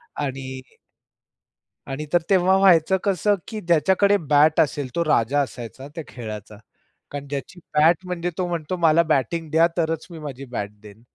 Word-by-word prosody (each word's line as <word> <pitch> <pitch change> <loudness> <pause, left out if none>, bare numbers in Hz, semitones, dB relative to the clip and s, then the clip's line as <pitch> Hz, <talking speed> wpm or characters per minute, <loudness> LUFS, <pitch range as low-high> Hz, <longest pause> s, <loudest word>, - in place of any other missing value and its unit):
आणि 135 -2 -4 1.3
आणि 135 +3 -4
तर 175 - +4
तेव्हा 190 0 +4
व्हायचं 190 -1 +5
कसं 200 +1 +2
की 220 -2 -5
ज्याच्याकडे 190 +4 +3
बॅट 150 +1 +5
असेल 145 -3 +1
तो 170 - +1
राजा 145 -1 +2
असायचा 130 +1 -7
त्या 165 - -5
खेळाचा. 105 -3 -8 0.5
कारण 145 0 -6
ज्याची 140 +5 -6
बॅट 160 +4 +4
म्हणजे 180 -1 -3
तो 180 - -1
म्हणतो, 170 0 -3
"मला 165 0 +4
बॅटिंग 160 +2 -1
द्या 165 +1 +5
तरच 160 -1 -1
मी 165 - -9
माझी 140 -3 -7
बॅट 105 -5 -5
देईन." 105 +1 -14
155 Hz, 155 wpm, -23 LUFS, 135-175 Hz, 1.3 s, व्हायचं